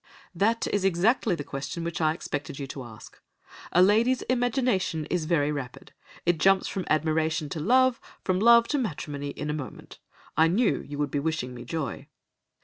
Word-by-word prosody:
"'That 220 +6 +1
is 205 -2 +1
exactly 195 +3 +2
the 145 - -5
question 140 +5 -5
which 170 0 -3
I 155 -1 +3
expected 145 -4 -5
you 140 - -4
to 135 0 -7
ask. 115 -2 -13 0.5
A 180 - +5
lady's 230 +6 +3
imagination 245 - 0
is 175 -3 0
very 150 -3 +1
rapid; 135 -4 -7 0.3
it 175 -2 +2
jumps 195 +3 +4
from 190 -2 -4
admiration 155 0 +1
to 155 - -4
love, 255 +8 +3 0.2
from 185 -1 +1
love 235 +2 +6
to 290 - +1
matrimony 145 - -4
in 150 +1 -4
a - - -2
moment. 145 -4 -8 0.4
I 160 - +5
knew 205 +7 +2
you 145 0 -8
would 145 -1 -1
be 145 - 0
wishing 150 -4 -2
me 120 -1 -9
joy. 155 -7 -4
165 Hz, 180 wpm, -27 LUFS, 145-205 Hz, 0.5 s, love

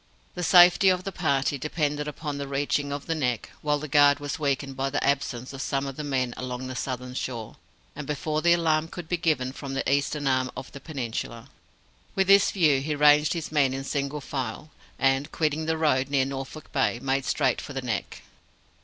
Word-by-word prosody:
The 180 - -5
safety 180 +2 +7
of 185 0 +1
the 195 - -4
party 140 -5 0
depended 150 0 -1
upon 150 -1 -5
the 140 - -4
reaching 140 +1 -1
of 140 0 -4
the 165 - -1
Neck 125 -8 -2
while 150 -1 +1
the 155 +1 -6
guard 145 0 +5
was 145 +1 -4
weakened 140 -2 -1
by 135 +1 -1
the 145 - -1
absence 135 -2 -1
of 135 - -6
some 135 0 -1
of 135 -1 -5
the 150 - -5
men 130 -4 -1
along 130 0 -5
the 130 0 -6
southern 125 -1 -4
shore, 120 -4 -5 0.4
and 145 -1 -7
before 150 +2 -1
the 170 +2 +4
alarm 160 -2 +2
could 175 -1 -8
be 175 - 0
given 155 -7 0
from 135 0 -7
the 135 - -2
eastern 140 +1 0
arm 130 -1 +2
of 130 -1 -7
the 140 - -9
peninsula. 125 -4 -5 0.7
With 195 - +3
this 195 0 +6
view, 155 -8 +3
he 150 +2 -2
ranged 150 +1 +5
his 165 -3 -4
men 140 -4 +2
in 135 - -4
single 140 +1 -3
file; 135 +2 -5 0.3
and, 135 +1 +1
quitting 155 0 -1
the 160 0 +1
road 140 -4 +2
near 140 -2 +2
Norfolk 135 +2 -7
Bay, 135 -3 +1
made 135 +1 0
straight - - +1
for - - -8
the - - -3
Neck. - - -4
140 Hz, 205 wpm, -26 LUFS, 135-155 Hz, 0.7 s, safety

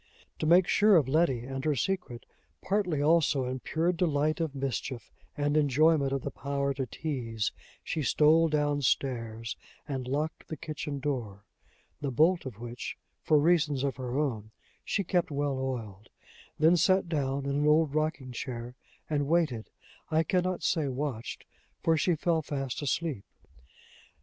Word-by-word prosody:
To 155 - -1
make 175 +2 +6
sure 210 -1 +5
of 150 -6 +4
Letty 135 -4 +2
and 135 +2 -5
her 150 -2 +1
secret, 140 -5 -2 0.4
partly 185 -7 0
also 155 -4 +3
in 130 +1 -3
pure 165 +6 0
delight 155 -3 +1
of 160 -4 -2
mischief, 135 -2 -4 0.3
and 145 0 +1
enjoyment 150 0 +3
of 135 -1 -2
the - - -3
power 140 0 -2
to 135 -1 -3
tease, 115 -7 -3 0.3
she 160 - -2
stole 155 +3 +4
down 145 -1 +1
stairs, 115 -3 -1 0.3
and 130 -3 -4
locked 150 +4 -2
the 155 - -5
kitchen 145 -1 -5
door 115 -8 -4 0.5
the 140 - -2
bolt 160 +5 +3
of 120 -6 -8
which, 120 +1 -6 0.2
for 155 - +3
reasons 150 -3 +3
of 140 -2 -1
her 130 0 -3
own, 115 -8 -1 0.3
she 200 - -1
kept 180 -1 +1
well 140 -2 -1
oiled; 115 -7 -5 0.5
then 160 +3 +5
sat 185 +2 +3
down 140 -4 -1
in 140 - -1
an 145 +2 +1
old 155 -1 +4
rocking 155 -4 -1
chair, 120 -1 -5 0.3
and 145 -2 0
waited 155 -9 +1 0.4
I 160 +1 +3
can 180 +2 +1
not 185 0 -2
say 155 -4 +1
watched, 130 -3 -4 0.4
for 165 - +4
she 170 +2 +2
fell 165 +1 +1
fast 135 -3 -4
asleep. 145 -4 -1
145 Hz, 160 wpm, -29 LUFS, 130-160 Hz, 0.5 s, make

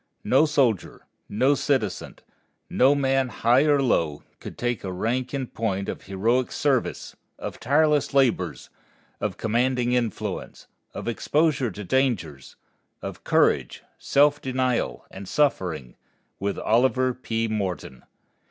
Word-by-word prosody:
No 155 - +4
soldier, 130 - 0 0.2
no 130 +7 +3
citizen, 135 -8 -1 0.6
no 135 +3 +4
man 135 -2 +1
high 120 +6 +3
or 145 -2 +4
low, 80 - 0 0.2
could - - -9
take 120 -2 -2
rank 115 +7 -2
in 140 -2 -2
point 100 -5 -3
of - - -5
heroic 115 +6 0
service, 135 -4 -1 0.2
of - - -7
tireless 150 +3 +2
labors, 120 - +1 0.5
of - - -3
commanding 120 +2 0
influence, 120 -4 -3 0.3
of - - -6
exposure 140 +2 +1
to 105 +1 -8
dangers, 95 - -1 0.5
of - - -7
courage, - - +1 0.2
self 145 +1 +3
denial 130 -2 -1
and 95 0 -9
suffering, 90 - 0 0.4
with 100 0 -2
Oliver 130 +2 +2
P. 115 -2 -2
Morton. 95 - -4
125 Hz, 120 wpm, -25 LUFS, 105-135 Hz, 0.6 s, No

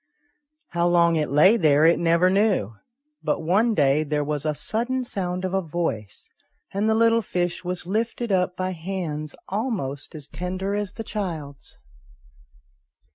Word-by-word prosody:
How 170 0 +1
long 170 -1 +4
it 155 -2 0
lay 155 - +5
there 155 -4 +4
it 170 - +5
never 170 +2 +3
knew, 195 - +2 0.5
but - - -1
one 210 +7 +2
day 145 0 +3
there 150 -1 -1
was 150 0 -2
a 150 - 0
sudden 245 - -1
sound 185 -5 -3
of 185 - -3
a 195 - +2
voice, 155 - -4 0.5
and 205 +3 +1
the 220 - +3
little 230 0 +4
fish 175 -3 -2
was 180 0 -3
lifted 225 +4 -2
up 180 -1 +1
by 185 0 -1
hands 160 -4 -4
almost 185 - -3
as 150 -2 -8
tender 185 +4 -4
as 205 -1 -2
the 225 - -6
child's. 165 -10 -6
180 Hz, 155 wpm, -24 LUFS, 155-200 Hz, 0.5 s, lay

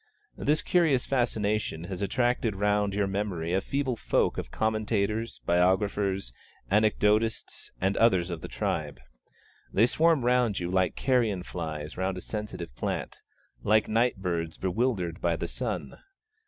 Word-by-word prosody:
This 150 +1 +1
curious 160 -8 +3
fascination 110 -9 0
has 90 +1 -6
attracted 120 +1 +1
round 105 0 +1
your 100 -1 +2
memory 95 -4 -2
a 95 - +2
feeble 135 +2 -1
folk - - +1
of - - -6
commentators, 110 - -1
biographers, 95 - +1 0.4
anecdotists, 105 +1 +1
and 95 +2 +1
others 95 -6 +3
of 85 -2 -5
the - - -6
tribe. 75 -5 -3 0.7
They 110 - +5
swarm 155 0 +3
round 125 -4 +2
you 90 0 -3
like 95 -1 +1
carrion 115 -8 +1
flies 80 -4 -5
round 95 0 -1
a - - -5
sensitive 105 - -5
plant, - - -4 0.4
like 110 - +3
night 115 +2 +2
birds 85 -4 -3
bewildered 95 -3 -1
by - - +1
the - - -3
sun. - - -4
105 Hz, 140 wpm, -28 LUFS, 90-115 Hz, 0.7 s, They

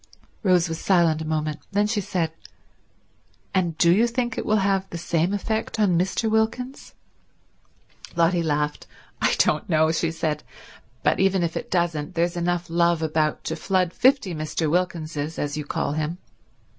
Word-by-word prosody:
Rose 180 -4 +3
was 165 0 -4
silent 170 -4 +3
a - - -4
moment. 155 -1 -2
Then 205 +1 +2
she 210 0 0
said, 170 -3 -1 1.2
"And 175 -4 0
do 170 0 +5
you 220 +7 +4
think 240 0 -2
it - - -4
will 215 - +3
have 195 -1 +1
the 170 - -5
same 170 +1 0
effect 220 +2 -2
on 200 -5 +3
Mr. 190 +6 0
Wilkins?" 230 +5 -1 1.2
Lotty 170 +1 +3
laughed. 150 -2 -1 0.3
"I - - +3
don't 155 +6 +2
know," 160 -1 +3
she 165 0 0
said. 155 -2 -2 0.6
"But - - +2
even 190 -1 +3
if 165 -1 -2
it - - -4
doesn't, 170 -4 -1
there's 170 +1 +1
enough 175 0 -1
love 170 -1 +2
about 155 -1 0
to 160 - -3
flood 185 +1 0
fifty 260 -8 +3
Mr. 155 +1 -2
Wilkinses, 160 -3 -2
as 145 0 -2
you 150 -1 -4
call 145 - -2
him. 155 +3 -2
170 Hz, 165 wpm, -24 LUFS, 160-190 Hz, 1.2 s, do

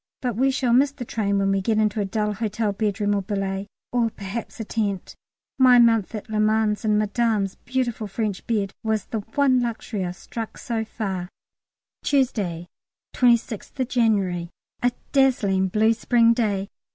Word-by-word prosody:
But 245 -5 -2
we 265 +4 +3
shall 260 -3 +1
miss 270 +4 +5
the 280 -3 -7
train 200 -3 0
when 195 0 +2
we 195 0 +1
get 215 +3 +1
into 215 0 +1
a - - 0
dull 210 +1 -1
hotel 215 0 -1
bedroom 205 0 0
or 200 - +1
a - - -3
billet, 195 0 -3 0.2
or 240 -2 +2
perhaps 210 +3 -7
a - - -2
tent. 205 -4 -2 0.5
My 255 -1 +7
month 230 -3 +4
at 215 - -6
Le 215 -1 -2
Mans 215 0 +2
in 210 -1 +2
Madame's 210 -2 +1
beautiful 240 -4 -3
French 205 -1 -3
bed 205 -4 0
was 220 -2 0
the 225 - -3
one 255 +4 +2
luxury 225 -3 -3
I've 180 0 -4
struck 225 +4 -7
so 230 -2 -2
far. 190 -5 -4 0.7
Tuesday, 205 - 0 0.5
26th 240 +1 +1
January. 195 -8 +1 0.3
A 245 - +3 0.2
dazzling 220 -9 +3
blue 220 +4 +3
spring 230 +1 +3
day. 205 -4 -1
220 Hz, 165 wpm, -24 LUFS, 200-235 Hz, 0.7 s, My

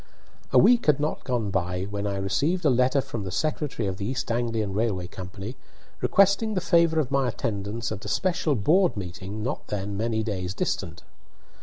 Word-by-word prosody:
A - - +5
week 240 -5 +5
had 150 -2 +5
not 150 +1 -2
gone 120 -6 -1
by 90 0 -1
when 100 +1 -3
I 100 -1 -2
received 140 - 0
a 145 - +5
letter 130 +2 +3
from 115 -4 -5
the 95 - -4
secretary 145 - -1
of 95 -1 -3
the 100 - -4
East 125 -1 -2
Anglian 115 -4 -1
Railway 100 -4 0
Company, 95 +5 -7 0.5
requesting 200 +2 +3
the - - +2
favour 170 -2 +3
of 140 -3 -1
my 135 -2 +2
attendance 110 -1 -3
at 100 -2 -5
a - - -6
special 170 -5 +1
board 165 - +3
meeting 95 +3 -6
not 130 +6 -3
then 100 0 -3
many 110 +1 0
days 95 -4 -3
distant. - - -3
115 Hz, 185 wpm, -26 LUFS, 100-150 Hz, 0.5 s, A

